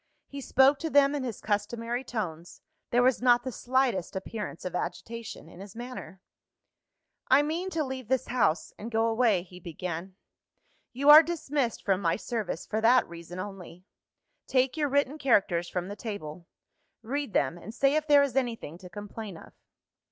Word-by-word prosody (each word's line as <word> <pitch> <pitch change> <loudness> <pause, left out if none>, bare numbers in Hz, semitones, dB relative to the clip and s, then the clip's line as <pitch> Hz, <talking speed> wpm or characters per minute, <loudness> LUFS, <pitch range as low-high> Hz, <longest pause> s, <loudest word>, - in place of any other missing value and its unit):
He 280 0 -8
spoke 270 +2 +4
to 325 - -3
them 285 -1 +5
in 285 -2 -2
his 235 -5 -5
customary 230 +4 -2
tones; 175 -9 -6 0.3
there 245 +1 +3
was 255 -1 +3
not 245 -1 +4
the 260 - -4
slightest 245 -8 0
appearance 190 -2 -6
of 180 - -4
agitation 225 +3 -5
in 170 - -14
his 195 +1 -10
manner. 240 -5 -8 1.1
"I 275 +2 +5
mean 335 +5 -2
to 325 -4 -1
leave 260 -3 -6
this 260 0 +1
house, 210 -10 +1
and 220 - -6
go 225 -1 +1
away," 225 -5 +2
he 180 0 -13
began. 175 +2 -6 0.8
"You 280 +3 +5
are 305 +1 +12
dismissed 295 -7 -2
from 195 -1 +2
my 165 -3 +2
service, 220 -7 -4
for 220 - -2
that 240 +3 +5
reason 170 +1 -10
only. 185 -2 -8 0.6
Take 260 +1 +2
your 300 -2 0
written 285 +2 +1
characters 190 - +2
from 180 0 -3
the 200 - -6
table; 180 -7 -7 0.6
read 275 +1 -3
them, 140 +6 +1
and 190 +5 -9
say 275 +4 +2
if 310 0 0
there 290 -1 +6
is 270 -3 -2
anything 230 - -2
to 180 - -11
complain 205 -1 -8
of." - - -14
230 Hz, 175 wpm, -28 LUFS, 185-265 Hz, 1.1 s, are